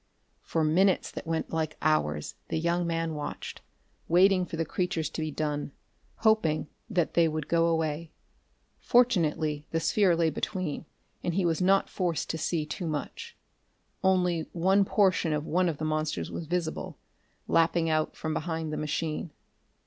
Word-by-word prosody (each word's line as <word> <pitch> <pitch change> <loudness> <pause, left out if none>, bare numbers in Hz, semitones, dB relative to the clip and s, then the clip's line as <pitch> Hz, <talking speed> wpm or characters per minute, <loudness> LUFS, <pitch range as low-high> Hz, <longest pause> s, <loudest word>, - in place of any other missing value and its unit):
For 160 - -1
minutes 185 +5 +3
that - - -7
went 165 -1 -2
like 160 -1 -1
hours 75 - 0
the - - -2
young 170 +1 0
man 165 -1 -1
watched, 150 -1 -6 0.5
waiting 185 +1 +4
for 165 - -5
the 165 - 0
creatures 170 -2 -2
to - - -4
be 155 - -1
done, 150 -1 -3 0.4
hoping 215 -9 +2 0.2
that 180 -6 0
they 170 -1 +4
would 155 -1 -3
go 170 0 +3
away. 160 -1 -1 0.7
Fortunately 160 -11 +2
the 165 - 0
sphere 190 0 +3
lay 165 -1 +2
between, 170 -1 -3 0.4
and 170 - -1
he 190 -2 +2
was 165 +1 +1
not 195 +2 +4
forced 175 -4 -1
to 160 - -4
see 160 -1 -1
too 170 +3 -4
much. 465 - -5 0.7
Only 180 -4 +2
one 190 +3 +3
portion 185 -6 +2
of 150 0 -1
one 180 +2 +2
of 155 - -3
the 155 - -3
monsters 155 - -1
was 165 - -5
visible, 170 -1 -3 0.5
lapping 165 0 +3
out 155 -1 0
from 160 -1 -3
behind 160 -1 -3
the - - -2
machine.... 155 +2 -2
165 Hz, 160 wpm, -28 LUFS, 155-180 Hz, 0.7 s, waiting